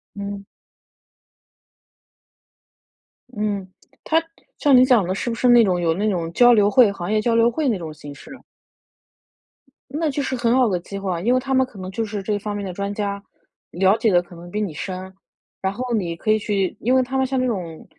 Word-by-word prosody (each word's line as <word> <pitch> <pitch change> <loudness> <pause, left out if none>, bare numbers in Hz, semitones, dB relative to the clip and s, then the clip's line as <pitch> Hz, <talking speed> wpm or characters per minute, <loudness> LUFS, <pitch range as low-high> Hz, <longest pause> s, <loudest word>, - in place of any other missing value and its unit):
嗯。 200 0 -6 2.9
嗯， 205 -2 -2 0.4
它 325 +1 +2 0.3
像 285 -3 +4
你 255 0 +7
讲 245 -6 +4
得 185 - -1
是 210 - -3
不 230 - -2
是 250 - +1
那 240 -1 +7
种 185 -4 +1
有 165 -2 +1
那 210 +5 0
种 170 -4 -2
交 245 +3 +6
流 205 -3 +4
会， 235 -2 +5
行 195 0 -5
业 215 0 +2
交 230 0 +1
流 230 +1 +4
会 295 +4 -1
那 230 -6 +1
种 160 -3 -7
形 145 -1 -10
式 235 - -14
呢？ 260 - -10 1.5
那 305 +2 -1
就 285 - -2
是 265 -1 -2
很 235 -1 +1
好 255 -2 +4
的 190 -4 0
机 195 +3 -7
会 195 -1 -3
啊， 170 -1 -3
因 240 +5 +2
为 255 - +3
他 270 +1 -3
们 260 0 +3
可 235 -6 -14
能 185 0 -6
就 225 +4 -2
是 210 -2 -4
这 205 +1 -1
方 205 0 -5
面 205 -1 -4
的 185 - -5
专 200 +2 -4
家， 200 -1 -3 0.5
了 190 +4 +3
解 225 -2 +2
的 175 -1 +4
可 175 0 -15
能 175 +1 -12
比 210 - -2
你 185 -7 -3
深。 185 +3 -6 0.5
然 190 0 -1
后 250 +2 -4
你 180 -7 -1
可 190 - -5
以 215 - +4
去 200 -3 -2
因 245 +4 +1
为 260 - +5
它 265 +1 -3
们 265 - +2
像 260 0 -2
这 255 - +1
种 175 -8 -5
205 Hz, 240 characters per minute, -21 LUFS, 190-245 Hz, 2.9 s, 你